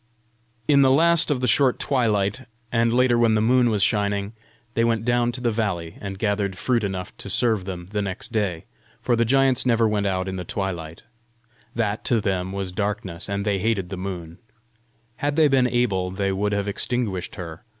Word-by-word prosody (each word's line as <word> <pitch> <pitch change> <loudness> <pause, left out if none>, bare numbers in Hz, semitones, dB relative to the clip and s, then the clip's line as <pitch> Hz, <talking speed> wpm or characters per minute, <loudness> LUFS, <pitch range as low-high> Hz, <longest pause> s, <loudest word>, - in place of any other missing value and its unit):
In 140 -2 +5
the 135 - +5
last 170 +5 +4
of 140 -4 0
the 125 - +1
short 130 +2 +3
twilight, 115 -2 0 0.2
and 115 0 +2
later 120 0 +3
when 115 -2 +4
the - - +3
moon 120 +2 +3
was 105 -3 +1
shining, 100 0 0 0.4
they 115 - +1
went 115 -1 +1
down 120 0 +2
to 125 - -6
the 120 -1 +1
valley, 95 -7 -3
and 100 -1 -5
gathered 100 -2 -1
fruit 115 +3 0
enough 95 -2 -4
to - - -7
serve 110 -6 +1
them 90 -2 -6
the 105 -1 -1
next 100 +4 -5
day; 100 -7 -1 0.3
for 120 - +1
the 115 0 +2
giants 135 +1 +3
never 115 -2 +3
went 105 -1 0
out 95 -1 -1
in 95 0 -4
the 90 - -4
twilight: 85 -4 -4 0.7
that 110 -2 -1
to 120 - +3
them 95 -3 -1
was 95 -1 -4
darkness; 100 -2 -3
and 100 +1 -2
they 100 -2 +1
hated 100 -3 0
the 95 - -4
moon: 90 -3 -6 0.8
had 145 0 -1
they 155 -1 +5
been 135 -3 +3
able, 105 -7 0
they 100 +1 -1
would 100 +2 -1
have 100 0 -1
extinguished 100 -3 -2
her. 85 -1 -8
105 Hz, 195 wpm, -23 LUFS, 95-120 Hz, 0.8 s, In